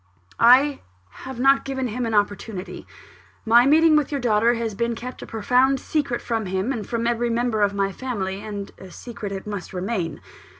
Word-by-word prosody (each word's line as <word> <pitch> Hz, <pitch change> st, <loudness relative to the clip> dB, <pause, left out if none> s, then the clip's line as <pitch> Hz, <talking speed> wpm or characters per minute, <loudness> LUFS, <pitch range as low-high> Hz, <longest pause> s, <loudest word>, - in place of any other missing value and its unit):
"I 265 Hz, +5 st, +5 dB, 0.5 s
have 260 Hz, -2 st, -7 dB
not 275 Hz, +2 st, +4 dB
given 265 Hz, -1 st, -3 dB
him 235 Hz, +2 st, -3 dB
an 225 Hz, -, -1 dB
opportunity. 205 Hz, -1 st, -2 dB, 0.6 s
My 235 Hz, +3 st, +6 dB
meeting 315 Hz, +2 st, +5 dB
with 300 Hz, -1 st, +1 dB
your 285 Hz, -, -1 dB
daughter 235 Hz, -1 st, +2 dB
has 230 Hz, -2 st, -3 dB
been 235 Hz, +3 st, -1 dB
kept 250 Hz, +2 st, -8 dB
a -, -, -8 dB
profound 250 Hz, +5 st, +2 dB
secret 280 Hz, -5 st, -2 dB
from 225 Hz, -4 st, -2 dB
him, 190 Hz, +7 st, -1 dB
and 215 Hz, -6 st, -5 dB
from 235 Hz, -1 st, -2 dB
every 235 Hz, 0 st, 0 dB
member 230 Hz, -2 st, 0 dB
of 200 Hz, 0 st, +2 dB
my 195 Hz, 0 st, 0 dB
family; 200 Hz, -5 st, -4 dB
and 205 Hz, -2 st, -6 dB
a 190 Hz, -, -11 dB
secret 210 Hz, 0 st, -8 dB
it 195 Hz, -1 st, -6 dB
must 205 Hz, -3 st, -6 dB
remain. 185 Hz, -3 st, -3 dB
230 Hz, 185 wpm, -23 LUFS, 205-255 Hz, 0.6 s, My